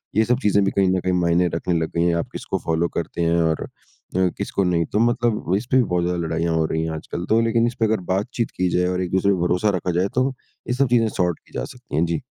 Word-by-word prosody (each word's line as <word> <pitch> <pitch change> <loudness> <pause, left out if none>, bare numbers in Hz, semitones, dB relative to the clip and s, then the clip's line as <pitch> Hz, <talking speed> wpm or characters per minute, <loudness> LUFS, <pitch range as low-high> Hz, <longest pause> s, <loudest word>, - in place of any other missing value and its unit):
ये 110 - +5
सब 125 +2 +1
चीज़ें 100 -1 +3
भी 100 - +1
कहीं 95 -1 +2
न 95 0 +2
कहीं 90 0 -1
मायने 90 0 +2
रखने 85 +2 -1
लग 80 -1 -2
गई 85 - +2
हैं, 85 -1 +2
आप 85 - -2
किसको - - -3
फ़ॉलो 80 +1 +1
करते 85 +1 -3
हैं 85 0 +2
और 80 -1 0
अ, - - -7 0.7
किसको 100 - -1
नहीं। 85 -2 +1
तो 105 - -1
मतलब 120 -5 +1
इस 105 - -4
पे 130 - +5
भी 130 - +5
बहुत 90 -5 0
ज़्यादा 90 0 -1
लड़ाइयाँ 80 +1 0
हो 80 -1 +2
रही 80 +1 -1
हैं 80 - -2
आजकल। 85 +2 -5
तो 110 - +4
लेकिन 115 0 +2
इस 120 - -4
पे 115 - +3
अगर 110 0 +1
बातचीत 105 +4 -2
की 90 0 +1
जाए 90 0 +2
और 90 0 -1
एक-दूसरे 95 +2 +1
पे 95 - -2
भरोसा 90 +4 +2
रखा 90 0 -1
जाए 95 - +2
तो 130 +2 +2 0.4
ये 125 - 0
सब 135 +2 +2
चीज़ें 115 -2 +3
सॉर्ट 90 -5 -1
की - - -23
जा - - -2
सकती 125 - -9
हैं। 80 +3 +3
जी। 85 -2 -2
90 Hz, 275 wpm, -22 LUFS, 85-110 Hz, 0.7 s, ये